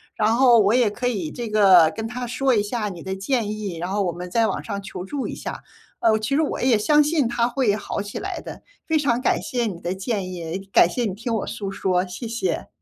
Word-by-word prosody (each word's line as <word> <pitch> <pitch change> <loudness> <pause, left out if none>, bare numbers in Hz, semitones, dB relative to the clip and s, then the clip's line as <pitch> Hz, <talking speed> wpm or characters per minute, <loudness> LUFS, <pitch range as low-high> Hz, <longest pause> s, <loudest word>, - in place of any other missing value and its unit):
然 220 +1 +2
后 245 -2 +6
我 210 +2 +4
也 240 -4 +3
可 245 +4 -2
以 190 -11 -2
这 235 -2 -5
个 190 -6 +6
跟 225 0 -3
他 245 +1 -5
说 265 +2 +1
一 210 - +3
下 210 +1 -2
你 175 -4 -8
的 190 +2 -4
建 210 +2 -1
议， 210 -5 -5
然 175 +2 -3
后 200 +1 0
我 175 - 0
们 180 +1 -7
在 225 +5 +2
网 195 - -3
上 200 -2 -4
求 190 -2 -7
助 270 +7 -3
一 - - -5
下。 - - -6 0.4
呃， 220 -1 +3
其 220 +6 -1
实 305 - +3
我 310 - -2
也 250 -3 +4
相 295 +8 +4
信 295 -3 +1
他 240 0 +1
会 245 -4 +1
好 210 - -4
起 205 0 -6
来 - - -4
的， - - -9 0.2
非 320 -1 +1
常 245 -4 +1
感 - - +1
谢 250 -6 -2
你 185 -5 -5
的 175 +2 -3
建 190 -1 -3
议， 170 +1 -5
感 170 - +6
谢 240 +6 -1
你 200 - -2
听 230 +3 -4
我 220 - -2
诉 200 -2 -4
说， 185 -1 0
谢 185 +6 -7
谢。 235 +10 -2
215 Hz, 270 characters per minute, -23 LUFS, 190-245 Hz, 0.4 s, 后